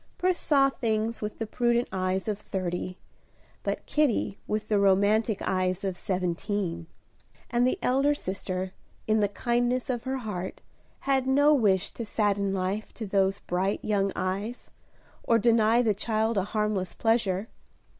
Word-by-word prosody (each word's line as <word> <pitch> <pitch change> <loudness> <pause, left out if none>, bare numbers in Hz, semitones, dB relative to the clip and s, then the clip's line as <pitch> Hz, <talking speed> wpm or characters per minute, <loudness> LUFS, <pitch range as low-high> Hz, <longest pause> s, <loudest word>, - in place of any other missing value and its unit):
Pris 365 0 +1
saw 275 -2 +4
things 225 -2 -1
with 210 0 -4
the 225 - -2
prudent 240 +2 +1
eyes 185 +1 -1
of 210 -2 -1
thirty, 185 -2 -3 0.6
but - - -3
Kitty 285 -9 +1
with 215 0 -2
the 210 -2 +2
romantic 200 +2 +3
eyes 185 0 0
of 190 -2 -1
seventeen; 180 -1 -2 0.6
and 240 +1 +3
the 255 - 0
elder 275 +3 +3
sister, 185 -4 -4 0.3
in 215 0 +2
the 205 - +3
kindness 240 +4 0
of 240 -1 -4
her 265 +1 -1
heart, 195 -7 -5 0.4
had 270 -1 +1
no 285 +3 +5
wish 200 -8 +2
to 235 - -6
sadden 205 -2 0
life 195 +3 -2
to 225 - -5
those 195 0 +1
bright 185 +3 -1
young 200 -2 +1
eyes, 200 +6 -3 0.5
or 230 - +3
deny 230 +1 +4
the 220 -3 +3
child 220 +2 0
a 195 -2 +1
harmless 210 -3 -1
pleasure. 220 -3 +1
210 Hz, 150 wpm, -27 LUFS, 190-235 Hz, 0.6 s, no